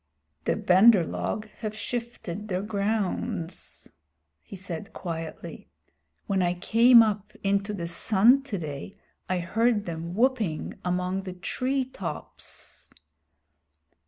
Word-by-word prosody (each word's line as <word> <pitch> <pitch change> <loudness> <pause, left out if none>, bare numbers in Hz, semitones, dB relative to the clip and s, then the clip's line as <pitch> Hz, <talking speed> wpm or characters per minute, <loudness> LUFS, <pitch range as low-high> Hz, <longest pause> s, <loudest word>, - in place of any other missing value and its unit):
"The - - +2
Bandar 190 +1 +6
log 215 +6 -3
have 215 -1 -4
shifted 215 -5 -4
their 185 -1 -1
grounds," 200 -4 -2 0.5
he - - -11
said 185 +2 -6
quietly. 165 -3 -6 0.6
"When 195 -2 +1
I 175 0 +1
came 230 +6 +7
up 210 -2 -2
into 200 +1 +1
the 185 -5 -4
sun 215 +9 +4
today 170 - -6 0.3
I 185 - +1
heard 215 +4 +1
them 170 +1 -5
whooping 225 - +1
among 180 +1 -1
the 190 -1 -6
tree 255 +8 -1
tops." 200 -8 -7
200 Hz, 110 wpm, -27 LUFS, 180-225 Hz, 0.6 s, came